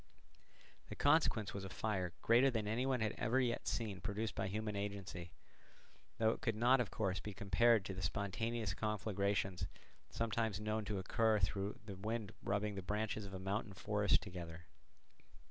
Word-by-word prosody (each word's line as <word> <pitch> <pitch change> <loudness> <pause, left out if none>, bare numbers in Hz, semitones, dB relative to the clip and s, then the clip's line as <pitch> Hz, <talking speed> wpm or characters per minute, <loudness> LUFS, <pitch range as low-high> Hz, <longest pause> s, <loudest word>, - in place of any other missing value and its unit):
The - - -5
consequence 145 -8 +3
was 100 - -4
a 95 - -5
fire 95 -3 -1
greater 120 +4 +6
than 110 -4 -1
any 120 +5 0
one 130 -3 +1
had 110 -1 +2
ever 125 +3 +2
yet 120 -2 0
seen 105 -5 -2
produced 105 +2 -2
by 95 - -1
human 105 +1 -2
agency, 100 -4 -4 0.9
though 110 -1 +4
it - - -5
could 115 -3 0
not 120 +4 +5
of 120 -5 0
course 95 -4 -1
be 105 -2 -6
compared 100 +2 +4
to 95 - -3
the 95 - -5
spontaneous 105 +1 -1
conflagrations 100 -4 0 0.4
sometimes 110 -2 0
known 110 0 -1
to 105 -2 -2
occur 110 +3 +2
through 100 +1 -1
the 100 -3 -6
wind 110 +1 -3
rubbing 105 +2 0
the 95 - -4
branches 105 +2 -2
of 95 - -10
a - - -4
mountain 100 +2 -2
forest 105 +1 +2
together. 85 -4 -7
105 Hz, 170 wpm, -38 LUFS, 95-110 Hz, 0.9 s, greater